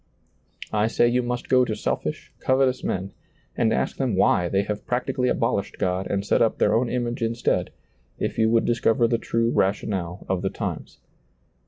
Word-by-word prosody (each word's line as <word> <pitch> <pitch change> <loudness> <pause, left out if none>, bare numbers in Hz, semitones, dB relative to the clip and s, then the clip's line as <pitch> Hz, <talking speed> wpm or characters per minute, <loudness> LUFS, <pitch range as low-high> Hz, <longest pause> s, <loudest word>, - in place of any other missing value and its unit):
I 105 0 +2
say 120 +1 +3
you 125 +1 +2
must 125 0 -3
go 130 -1 +4
to 110 -3 -2
selfish, - - -3
covetous 130 -1 +1
men, 95 +1 -2 0.4
and 110 -2 +2
ask - - -1
them 130 -7 0
why 90 -2 +3
they 100 +2 +1
have 105 0 -5
practically 125 +1 0
abolished 115 -6 -1
God 95 +1 -1
and 100 0 -1
set - - +2
up 115 - +2
their - - +3
own 115 +2 +2
image 120 0 -2
instead, 115 +1 0 0.5
if - - -3
you 110 0 +4
would 115 0 +3
discover 115 0 +2
the 115 0 0
true 115 0 0
rationale 95 -3 -1
of 95 -2 -1
the - - 0
times. - - -5
115 Hz, 180 wpm, -24 LUFS, 100-125 Hz, 0.5 s, go